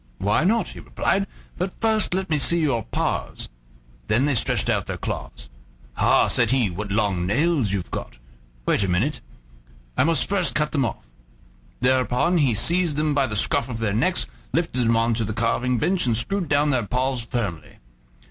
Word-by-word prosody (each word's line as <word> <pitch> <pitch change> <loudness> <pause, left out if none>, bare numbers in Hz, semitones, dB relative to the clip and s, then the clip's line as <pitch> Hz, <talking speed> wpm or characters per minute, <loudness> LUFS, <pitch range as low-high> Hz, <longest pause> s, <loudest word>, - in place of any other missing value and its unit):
"Why 105 - +1
not?" 215 +2 +1
he - - -10
replied; 195 +1 -1 0.3
"but 185 +1 -3
first 220 -4 +1
let 190 0 -1
me 150 - +2
see 170 +4 +2
your 140 -8 +1
paws." - - -3 0.6
Then 120 +6 +2
they 145 - +2
stretched 120 - +2
out - - 0
their - - -4
claws. - - -6 0.5
"Ha!" - - +3
said - - +3
he; 125 -7 +2
"what 100 +3 -5
long 100 -4 0
nails 140 - +1
you've 100 -3 -3
got! - - -6 0.5
Wait - - +2
a - - 0
minute: 110 +11 0 0.7
I - - +3
must 165 +2 +2
first 195 -3 +1
cut 150 0 +1
them 140 -4 +1
off." 115 - -5 0.8
Thereupon 130 +7 +2
he 130 -7 +2
seized 170 - +3
them 150 0 +1
by 140 -2 +2
the 110 - -4
scruff 135 +6 +1
of 115 - -4
their 110 -3 -1
necks, 110 - +1 0.3
lifted 125 -2 0
them 115 0 +3
on 115 +1 +2
to 115 0 -1
the 110 0 -3
carving 120 +3 0
bench, 175 - +1
and 115 -2 +1
screwed 175 - -1
down 145 +1 +3
their 120 -6 0
paws 130 +1 -1
firmly. 105 - -4
130 Hz, 185 wpm, -23 LUFS, 110-155 Hz, 0.8 s, Ha